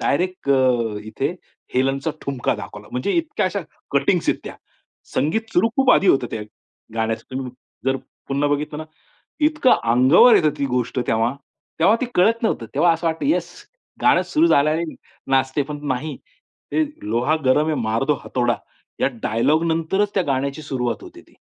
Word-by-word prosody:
Direct 180 Hz, 0 st, -1 dB
अ, 125 Hz, -5 st, +2 dB
इथे 135 Hz, +10 st, -3 dB, 0.4 s
हेलेनचा 135 Hz, +4 st, +1 dB
ठुमका 135 Hz, -3 st, -1 dB
दाखवला. 105 Hz, +1 st, -9 dB
म्हणजे 125 Hz, +11 st, -1 dB
इतक्या 330 Hz, -, 0 dB
अशा 200 Hz, +2 st, -2 dB, 0.3 s
कटिंग्स 140 Hz, +5 st, +2 dB
आहेत -, -, +1 dB
त्या. -, -, -7 dB, 0.6 s
संगीत 220 Hz, +12 st, 0 dB
सुरू 225 Hz, -, +4 dB
खूप 270 Hz, -1 st, +4 dB
आधी 195 Hz, -, +3 dB
होतं 130 Hz, -6 st, +4 dB
त्या 110 Hz, -, -4 dB, 0.5 s
गाण्याचं. 115 Hz, 0 st, -1 dB
तुम्ही 130 Hz, -1 st, -5 dB, 0.3 s
जर 135 Hz, 0 st, +2 dB, 0.3 s
पुन्हा 140 Hz, +1 st, +1 dB
बघितलं 150 Hz, +1 st, -2 dB
ना 155 Hz, -, -5 dB, 0.6 s
इतकं 305 Hz, -4 st, +3 dB, 0.2 s
अंगावर 135 Hz, -, +7 dB
येते 165 Hz, -7 st, +4 dB
ती 140 Hz, -, +1 dB
गोष्ट 125 Hz, 0 st, -1 dB
तेव्हा 115 Hz, +2 st, +1 dB, 0.5 s
तेव्हा 200 Hz, +7 st, +5 dB
ते -, -, +1 dB
कळत 225 Hz, +6 st, +3 dB
नव्हतं. 170 Hz, -, 0 dB
तेव्हा 170 Hz, +4 st, +4 dB
असं 165 Hz, +1 st, -2 dB
वाटतं 165 Hz, -, -2 dB
येस 300 Hz, -, +1 dB, 0.5 s
गाणं -, -, +5 dB
सुरू 320 Hz, +2 st, +2 dB
झाल्याने 155 Hz, -, +3 dB, 0.5 s
नाचते 135 Hz, +2 st, +2 dB
पण 145 Hz, +1 st, -6 dB
नाही. 135 Hz, +4 st, -2 dB, 0.6 s
ते 315 Hz, -, +2 dB, 0.3 s
लोहा 120 Hz, +7 st, +2 dB
गरम 150 Hz, +4 st, +3 dB
है 155 Hz, -, +1 dB
मार 110 Hz, +1 st, 0 dB
दो 150 Hz, -, +3 dB
हथोडा 120 Hz, -2 st, 0 dB, 0.5 s
या -, -, +4 dB, 0.2 s
डायलॉग 145 Hz, +9 st, +2 dB
नंतरच 165 Hz, +6 st, 0 dB
त्या 190 Hz, -, +2 dB
गाण्याची 140 Hz, +2 st, -1 dB
सुरुवात 125 Hz, -4 st, -2 dB
होती -, -, -12 dB
ती. -, -, -26 dB
140 Hz, 165 wpm, -21 LUFS, 125-175 Hz, 0.6 s, अंगावर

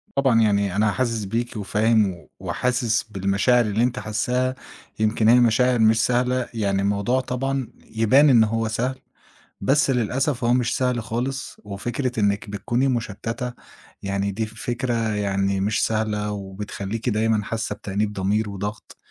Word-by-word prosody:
طبعًا 130 Hz, -5 st, +3 dB
يعني 100 Hz, -3 st, +2 dB
أنا 105 Hz, 0 st, +3 dB
حاسس 115 Hz, -2 st, -1 dB
بيكِ 115 Hz, +4 st, -3 dB
وفاهم 105 Hz, -2 st, +1 dB
وحاسس 120 Hz, -3 st, 0 dB
بالمشاعر 100 Hz, +4 st, +2 dB
اللي 105 Hz, +2 st, +1 dB
أنتِ 125 Hz, 0 st, 0 dB
حاسّاها، 125 Hz, +4 st, -1 dB, 0.4 s
يمكن 110 Hz, 0 st, +2 dB
هي 125 Hz, -, +7 dB
مشاعر 120 Hz, +1 st, +3 dB
مش 110 Hz, 0 st, +4 dB
سهلة، 125 Hz, 0 st, 0 dB
يعني 100 Hz, -3 st, 0 dB
الموضوع 100 Hz, +5 st, +1 dB
طبعًا 135 Hz, 0 st, -2 dB, 0.3 s
يبان 130 Hz, +7 st, +5 dB
إن 115 Hz, -4 st, +6 dB
هو 115 Hz, +1 st, 0 dB
سهل 125 Hz, +4 st, -2 dB, 0.6 s
بس 135 Hz, +7 st, +3 dB
للأسف 125 Hz, +2 st, 0 dB
هو 120 Hz, -, +3 dB
مش 125 Hz, -2 st, +1 dB
سهل 125 Hz, -2 st, 0 dB
خالص 125 Hz, +6 st, -4 dB
وفكرة 120 Hz, +5 st, -3 dB
إنِك 100 Hz, 0 st, 0 dB
بتكوني 120 Hz, +6 st, 0 dB
مُشتتَّة 120 Hz, +1 st, -3 dB, 0.5 s
يعني 100 Hz, 0 st, -1 dB
دي 110 Hz, +3 st, -2 dB
فكرة 120 Hz, +3 st, -3 dB, 0.2 s
يعني 100 Hz, -1 st, 0 dB
مش 100 Hz, +1 st, +1 dB
سهلة 105 Hz, -1 st, -1 dB
وبتخلّيكِ 100 Hz, +3 st, -5 dB
دايمًا 110 Hz, -1 st, +1 dB
حاسة 110 Hz, +1 st, -3 dB
بتأنيب 105 Hz, +1 st, -2 dB
ضمير 105 Hz, +2 st, 0 dB
وضغط 100 Hz, +2 st, -6 dB
110 Hz, 140 wpm, -23 LUFS, 105-125 Hz, 0.6 s, هي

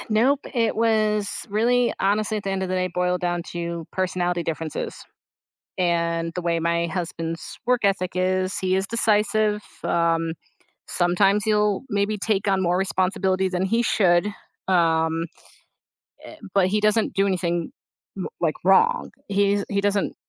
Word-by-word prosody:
Nope, 255 Hz, +6 st, +3 dB
it 230 Hz, -3 st, +1 dB
was 215 Hz, -2 st, +2 dB, 0.2 s
really 240 Hz, +4 st, +2 dB
honestly, 210 Hz, +2 st, +1 dB
at 205 Hz, -, -5 dB
the 195 Hz, -, -2 dB
end 190 Hz, 0 st, -2 dB
of 190 Hz, -, -2 dB
the 185 Hz, -, -1 dB
day, 185 Hz, 0 st, 0 dB
boiled 180 Hz, 0 st, 0 dB
down 175 Hz, -1 st, -1 dB
to 170 Hz, -1 st, -4 dB
personality 180 Hz, -2 st, -1 dB
differences. 160 Hz, -1 st, -4 dB, 0.8 s
And 170 Hz, -1 st, 0 dB
the 180 Hz, -, -3 dB
way 170 Hz, -1 st, 0 dB
my 170 Hz, 0 st, +1 dB
husband's 165 Hz, -1 st, -5 dB
work 250 Hz, -3 st, +2 dB
ethic 190 Hz, -2 st, +1 dB
is, 185 Hz, +1 st, 0 dB
he 185 Hz, 0 st, +1 dB
is 190 Hz, -, 0 dB
decisive. 210 Hz, -1 st, +1 dB, 0.2 s
Um, 165 Hz, -1 st, +1 dB, 0.5 s
sometimes 195 Hz, +4 st, +2 dB
he'll 210 Hz, -2 st, +2 dB
maybe 205 Hz, +1 st, 0 dB
take 200 Hz, -1 st, 0 dB
on 195 Hz, -1 st, +2 dB
more 175 Hz, 0 st, +1 dB
responsibility 190 Hz, 0 st, 0 dB
than 185 Hz, 0 st, -1 dB
he 230 Hz, +5 st, +1 dB
should, 180 Hz, -4 st, +3 dB, 0.4 s
um, 165 Hz, -2 st, +2 dB, 1.1 s
e -, -, -13 dB, 0.2 s
but 195 Hz, -2 st, +4 dB
he 210 Hz, +2 st, +1 dB
doesn't 215 Hz, +1 st, +2 dB
do 195 Hz, +1 st, +2 dB
anything 175 Hz, -3 st, -1 dB, 0.4 s
m 190 Hz, -, -4 dB
like 160 Hz, -3 st, +1 dB
wrong. 465 Hz, -, +3 dB, 0.2 s
He 200 Hz, 0 st, +2 dB
is 200 Hz, -1 st, -1 dB
he 200 Hz, -1 st, 0 dB
doesn't 205 Hz, 0 st, 0 dB
190 Hz, 155 wpm, -23 LUFS, 175-210 Hz, 1.1 s, but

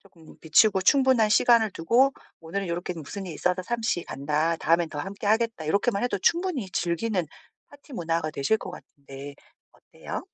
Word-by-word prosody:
쪼금 170 Hz, -5 st, -18 dB
비추고 190 Hz, +5 st, +4 dB
충분한 260 Hz, -1 st, +4 dB
시간을 225 Hz, 0 st, +4 dB
두고 240 Hz, +13 st, +3 dB, 0.3 s
"오늘은 185 Hz, +4 st, -4 dB
요렇게 175 Hz, +1 st, -3 dB
무슨 175 Hz, +5 st, -7 dB
일이 170 Hz, -, -6 dB
있어서 180 Hz, +1 st, 0 dB
잠시 220 Hz, -4 st, -1 dB
간다. 150 Hz, +4 st, -1 dB
다음엔 165 Hz, +1 st, +1 dB
더 150 Hz, -, -6 dB
함께 200 Hz, +5 st, -6 dB
하겠다." 225 Hz, -6 st, 0 dB
요렇게만 200 Hz, +3 st, +1 dB
해도 245 Hz, -, -1 dB
충분히 335 Hz, -, 0 dB
즐기는 180 Hz, +3 st, -1 dB, 0.4 s
파티 285 Hz, 0 st, -17 dB
문화가 165 Hz, -4 st, -1 dB
되실 155 Hz, +9 st, +1 dB
것 -, -, -7 dB
같은데 140 Hz, 0 st, -11 dB, 0.4 s
어때요? -, -, -8 dB
185 Hz, 375 characters per minute, -26 LUFS, 165-225 Hz, 0.4 s, 비추고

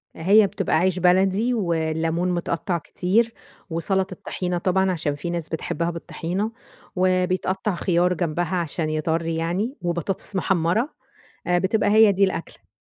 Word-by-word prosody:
آآ، -, -, -10 dB
هي 205 Hz, +2 st, +6 dB
بتبقى 195 Hz, -2 st, -1 dB
عيش 185 Hz, +2 st, +2 dB
بلدي 190 Hz, +6 st, +3 dB
والليمون 165 Hz, -2 st, 0 dB
متقطع 175 Hz, 0 st, -1 dB
كتير 205 Hz, +8 st, 0 dB, 0.4 s
وسلطة 185 Hz, +3 st, -1 dB
طحينة 180 Hz, -1 st, -2 dB
طبعًا، 190 Hz, +2 st, +1 dB
عشان 155 Hz, -4 st, -2 dB
في 170 Hz, +4 st, -5 dB
ناس 170 Hz, -2 st, -3 dB
بتحبها 170 Hz, +1 st, -2 dB
بالطحينة، 175 Hz, +5 st, -3 dB, 0.4 s
وبيتقطع 185 Hz, +1 st, +1 dB
خيار 175 Hz, 0 st, +2 dB
جنبها 175 Hz, +1 st, -1 dB
عشان 165 Hz, -2 st, -2 dB
يطرّي 160 Hz, +1 st, -1 dB
يعني، 180 Hz, -, -1 dB
وبطاطس 175 Hz, +3 st, -2 dB
محمرة، 190 Hz, -, +1 dB, 0.6 s
آآ، 175 Hz, 0 st, +3 dB
بتبقى 205 Hz, +3 st, +1 dB
هي 215 Hz, -1 st, +6 dB
دي 195 Hz, +1 st, +3 dB
الأكلة. 185 Hz, -3 st, -4 dB
180 Hz, 135 wpm, -23 LUFS, 170-190 Hz, 0.6 s, هي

